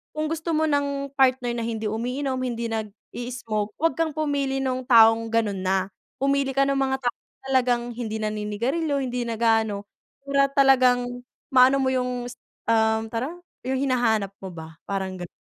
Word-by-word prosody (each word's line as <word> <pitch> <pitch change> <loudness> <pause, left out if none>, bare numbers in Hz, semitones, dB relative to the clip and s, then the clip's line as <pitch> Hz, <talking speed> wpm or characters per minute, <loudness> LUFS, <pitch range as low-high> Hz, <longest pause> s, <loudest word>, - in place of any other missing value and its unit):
kung 310 +1 -2
gusto 325 0 -2
mo 310 - +2
ng 280 -2 0
partner 260 -3 +2
na - - -2
hindi 220 -2 -3
umiinom, 255 +4 -2
hindi 235 -2 -3
nag-i-smoke, 220 0 -4
huwag 330 +1 0
kang 320 -2 0
pumili 280 -3 -1
no'ng 255 -1 -2
taong 225 -1 +6
gano'n 220 -4 0
na. 190 +1 0 0.2
Pumili 275 -1 0
ka 275 - +4
no'ng 275 0 +1
mga 265 0 +1
tao 245 - 0 0.4
talagang 245 -2 +2
hindi 230 -2 -5
naninigarilyo, 215 +9 -1
hindi 245 -1 -3
nag-aano, 225 -3 +1 0.4
para 275 0 +2
talagang 250 -2 +4 0.3
maano 265 +1 +5
mo 260 - +2
yung 250 -1 -1
s - - -11 0.3
um, 220 0 +2
tara 230 +3 -2 0.4
Yung 265 0 0
hinahanap 235 -7 +1
mo 190 - -7
ba, 160 -2 -10
parang 190 -2 -3
gan 175 - -5
245 Hz, 160 wpm, -24 LUFS, 220-270 Hz, 0.4 s, taong